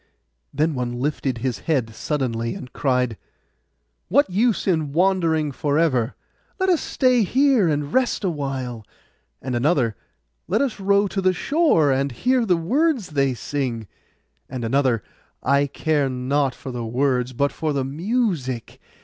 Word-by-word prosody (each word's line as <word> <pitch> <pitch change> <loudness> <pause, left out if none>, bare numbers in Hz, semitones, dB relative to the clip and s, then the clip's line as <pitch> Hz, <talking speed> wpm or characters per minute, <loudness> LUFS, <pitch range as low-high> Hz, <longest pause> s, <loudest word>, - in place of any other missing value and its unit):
Then 155 +1 +1
one 125 -2 -2
lifted 135 -2 -1
his 125 +1 -2
head 125 -8 +1
suddenly, 115 -3 -2
and 125 - -9
cried, 125 -5 0 0.9
'What 285 +3 +4
use 220 +4 +1
in 160 -6 0
wandering 165 -4 +2
for 145 +1 -1
ever? 130 -7 +1 0.4
Let 375 0 +2
us 350 -4 +3
stay 255 -3 +2
here 255 -1 +3
and 145 -1 -2
rest 255 -4 +1
awhile.' 135 - -3 0.6
And 130 -2 -2
another, 125 -4 +1 0.5
'Let 215 +8 +2
us 255 -7 -3
row 200 +1 +3
to 195 - -2
the 185 0 +3
shore, 230 - +2
and 135 +1 0
hear 250 - +1
the 180 -3 +3
words 255 - +1
they 140 -4 +1
sing.' 120 -5 -3 0.6
And 125 -2 -4
another, 130 -2 +1 0.4
'I 140 +2 +3
care 145 0 0
not 130 +1 0
for 130 - -8
the 120 -1 -4
words, 125 +2 0
but 140 +3 0
for 155 -1 -2
the 140 -2 -1
music. 160 - -2
145 Hz, 150 wpm, -22 LUFS, 130-190 Hz, 0.9 s, What